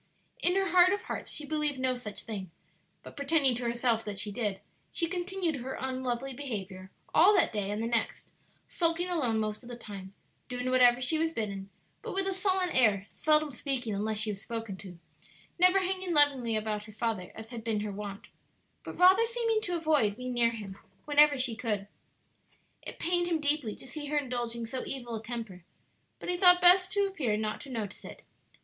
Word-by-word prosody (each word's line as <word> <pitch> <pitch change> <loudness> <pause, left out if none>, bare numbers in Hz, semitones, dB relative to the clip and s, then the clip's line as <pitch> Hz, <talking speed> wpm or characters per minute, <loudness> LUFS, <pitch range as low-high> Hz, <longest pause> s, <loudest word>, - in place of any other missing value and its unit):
In 355 +1 +2
her 390 0 +1
heart 365 0 +6
of 405 - -3
hearts - - -5
she 300 - -4
believed 300 -2 -1
no 260 0 0
such 220 -5 -6
thing, 200 -5 -6 0.5
but - - -12
pretending 280 -2 +2
to 240 +1 -4
herself 235 -1 0
that 205 -2 -5
she 205 +1 +1
did, 205 -3 -2 0.3
she 340 - 0
continued 355 -2 -2
her 260 +1 -6
unlovely 260 0 -3
behavior 195 -8 -6 0.2
all 390 +6 +6
that 385 - +3
day 205 -2 -2
and 210 +1 -3
the 225 - -2
next, 230 -1 -1 0.3
sulking 340 +1 -1
alone 260 -11 +1
most 215 -1 -3
of 245 - -12
the 245 - -6
time; 200 -4 -10 0.3
doing 250 0 -3
whatever 250 -1 +5
she 310 +5 +1
was 325 0 0
bidden, 200 -5 -4 0.3
but - - -6
with 390 0 +1
a 385 - -1
sullen 375 -1 +1
air, 210 -6 +3
seldom 305 -1 +3
speaking 250 -3 -3
unless 215 +2 -1
she 215 0 +1
was 200 -1 -7
spoken 225 -4 -5
to, 180 -3 -11 0.6
never 365 +2 +5
hanging 370 -2 -2
lovingly 270 -6 +4
about 215 -1 -2
her 215 - -12
father, 215 -4 -3
as 220 +1 -9
had 230 -2 -7
been 220 -2 -1
her 210 -1 -4
wont, 200 0 -7 0.6
but - - -8
rather 370 +5 +6
seeming 460 -1 0
to 355 -5 -3
avoid 300 -11 +2
being 250 +2 -5
near 235 -1 +3
him 205 -4 -8 0.3
whenever 295 -1 +5
she 250 -3 0
could. 210 -4 -3 0.9
It - - -8
pained 350 +1 +1
him 335 -2 0
deeply 290 -7 0
to - - -13
see 290 +3 -6
her 300 +1 -1
indulging 240 -4 -3
so 255 +3 -4
evil 240 -3 -5
a 220 - -4
temper, 225 -6 -7 0.5
but - - -9
he 355 0 -1
thought 360 -1 +7
best 365 +1 +7
to 405 -1 +2
appear 280 - -1
not 215 0 -3
to 285 - -10
notice 220 -6 -5
it. - - -11
250 Hz, 200 wpm, -29 LUFS, 215-325 Hz, 0.9 s, thought